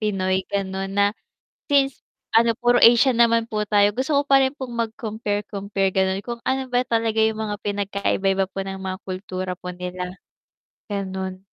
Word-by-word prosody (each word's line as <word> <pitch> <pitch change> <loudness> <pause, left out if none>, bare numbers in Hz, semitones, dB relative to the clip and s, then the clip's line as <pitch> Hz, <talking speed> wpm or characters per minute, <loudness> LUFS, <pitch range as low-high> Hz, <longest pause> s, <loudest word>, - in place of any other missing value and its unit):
Pinoy 190 -3 0
gano'n, 195 -1 -2
na 200 +1 +3 0.6
since 275 -2 +2 0.3
ano 230 +1 +5
puro 245 0 +3
Asian 240 +3 +7
naman 230 -1 +4
po 215 -2 -3
tayo 205 -1 +4
gusto 265 +5 0
ko 285 - +3
pa 275 -1 +5
rin 265 +1 +1
pong 255 -3 -6
mag-compare 220 -3 -3
compare 195 -1 -2
gano'n, 190 0 +1
kung 235 -1 -5
ano 265 +1 -1
ba 245 - +4
talaga 225 -3 0
'yong 220 0 +2
mga 215 -1 -2
pinagkaiba-iba 195 -1 0
po 195 - -14
ng 190 0 -6
mga 185 0 -4
kultura 185 -1 -4
po 180 0 -8
nila. 180 +1 -6 0.8
Gano'n. 190 -1 -4
205 Hz, 165 wpm, -23 LUFS, 190-235 Hz, 0.8 s, Asian